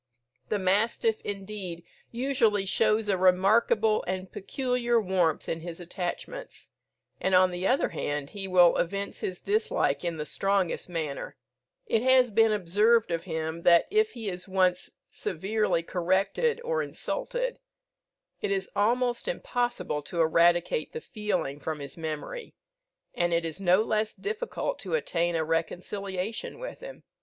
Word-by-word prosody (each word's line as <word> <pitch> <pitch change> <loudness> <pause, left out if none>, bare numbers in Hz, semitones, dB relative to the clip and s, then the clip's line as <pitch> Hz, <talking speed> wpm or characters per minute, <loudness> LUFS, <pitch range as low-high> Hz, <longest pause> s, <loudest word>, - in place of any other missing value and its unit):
The 210 - +1
mastiff, 210 +3 +1
indeed, 195 -4 -6 0.3
usually 235 -5 +1
shows 215 +2 +2
a 195 -3 +1
remarkable 210 +4 +4
and 185 0 -3
peculiar 240 +2 0
warmth 180 -6 +1
in 165 - -2
his 170 +1 -7
attachments; 180 - -6 0.5
and, 190 0 +2
on 185 0 +5
the 180 +2 -2
other 260 - +2
hand, 145 -1 -3
he 195 -1 -5
will 180 -2 +5
evince 200 +3 -2
his 180 -1 -4
dislike 425 - 0
in 170 -2 -2
the 150 - -3
strongest 195 0 0
manner. 155 -5 -4 0.5
It 225 - +1
has 255 -1 +5
been 225 +1 +4
observed 210 +3 +3
of 165 +1 -2
him, 160 -1 -3
that 170 0 +6
if 435 +1 +2
he 230 -3 -6
is 180 0 -4
once 185 -1 +1 0.2
severely 210 - -1
corrected 190 - +1
or 485 0 0
insulted, - - -3 0.8
it - - -1
is 195 -1 -1
almost 240 - +1
impossible 245 - -1
to 170 +4 -5
eradicate 170 - +3
the 470 - -5
feeling 210 - -2
from 155 +2 -3
his 140 -2 -8
memory, 160 - -6 0.6
and 175 0 0
it 170 0 0
is 165 +4 -5
no 185 +2 +4
less 215 0 -1
difficult 470 +3 -3
to - - -2
attain 175 - 0
a 160 - +1
reconciliation 185 +5 -3
with - - -7
him. - - -10
195 Hz, 145 wpm, -28 LUFS, 175-230 Hz, 0.8 s, that